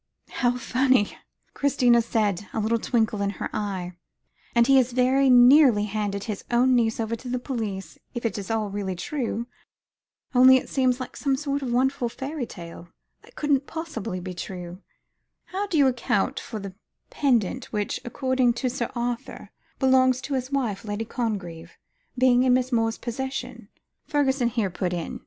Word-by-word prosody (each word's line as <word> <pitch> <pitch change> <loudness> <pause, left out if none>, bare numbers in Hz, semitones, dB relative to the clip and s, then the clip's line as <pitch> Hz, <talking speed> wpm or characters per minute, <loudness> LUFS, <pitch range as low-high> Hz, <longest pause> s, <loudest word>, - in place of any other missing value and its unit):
"How 245 0 +1
funny," 255 -2 +2 0.4
Christina 245 -4 +3
said, 210 -4 -1
a - - -1
little 225 +2 +1
twinkle 220 -3 0
in 200 - +1
her - - -4
eyes; 195 -4 -3 0.6
"and 235 0 +5
he 270 0 +6
very 255 +2 +2
nearly 250 -2 +7
handed 205 -1 -2
his 210 -3 -5
own 250 +2 +3
niece 225 -2 +1
over 225 0 -1
to 245 +2 -9
the 250 - -1
police 220 -7 -5 0.2
if 240 - -4
it 220 - 0
is 195 - -7
all 220 -2 -1
really 195 -2 -3
true. 235 - -3 0.9
Only 260 +1 +8
it - - -5
seems 255 -2 +1
like 255 - -7
some 275 -2 0
sort 285 0 -2
of 255 -3 -3
wonderful 250 0 +1
fairy 270 +1 -5
tale, 170 -1 -10 0.3
that - - -20
couldn't 285 -2 +1
possibly 310 - -5
be 180 0 -6
true." 180 +1 -7 0.6
"How 395 +2 -3
do 355 -5 -1
you 285 - +6
account 245 -6 0
for 225 - -7
the 200 -2 -7 0.4
pendant 255 -3 +1
which, 210 -2 -3
according 260 -1 +1
to 250 +1 -2
Sir 240 -2 -3
Arthur, 240 0 -4 0.3
belongs 260 -1 +4
to 275 - -5
his 260 0 -2
wife, 240 -7 -1
Lady 210 +1 -3
Congreve, 190 -9 -4 0.4
being 250 -1 +4
in 255 -1 +4
Miss 255 0 0
Moore's 225 -1 +1
possession," 265 +3 -5 0.4
Fergusson 270 -4 +1
here 225 -6 -1
put 180 0 -2
in. 170 -2 -4
240 Hz, 165 wpm, -25 LUFS, 210-260 Hz, 0.9 s, Only